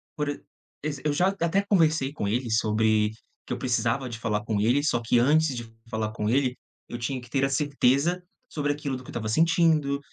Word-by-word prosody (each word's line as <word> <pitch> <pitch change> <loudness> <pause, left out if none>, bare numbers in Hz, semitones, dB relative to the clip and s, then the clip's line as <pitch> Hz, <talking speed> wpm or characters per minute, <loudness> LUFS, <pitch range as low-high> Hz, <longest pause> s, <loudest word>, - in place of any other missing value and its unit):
por 150 -2 -2
e 145 - -5 0.4
exe 150 -3 -3
eu 150 - +2
já 180 +6 +2
até 195 0 0
conversei 155 -7 +3
com 105 -9 -3
ele 120 +3 -1
sobre 110 -1 +2
o 110 -1 -20
que - - -2
eu - - -3
precisava 125 +1 0
de 115 - -6
falar 105 -2 -1
com 110 -3 -1
ele, 125 +7 +2
só 120 -5 +1
que 120 - +2
antes 150 +3 +3
de 120 - -4 0.3
falar 110 -1 -2
com 105 -1 -2
ele, 130 +1 +1 0.3
eu 120 - -5
tinha 130 +2 -2
que 120 - -14
ter 135 -1 +1
a 135 - 0
certeza 145 +4 +1 0.3
sobre 145 -1 -1
aquilo 145 -2 -4
do 130 - -11
que - - -14
eu - - -7
estava 110 -2 -4
sentindo, 160 0 +3
135 Hz, 225 wpm, -26 LUFS, 115-150 Hz, 0.4 s, conversei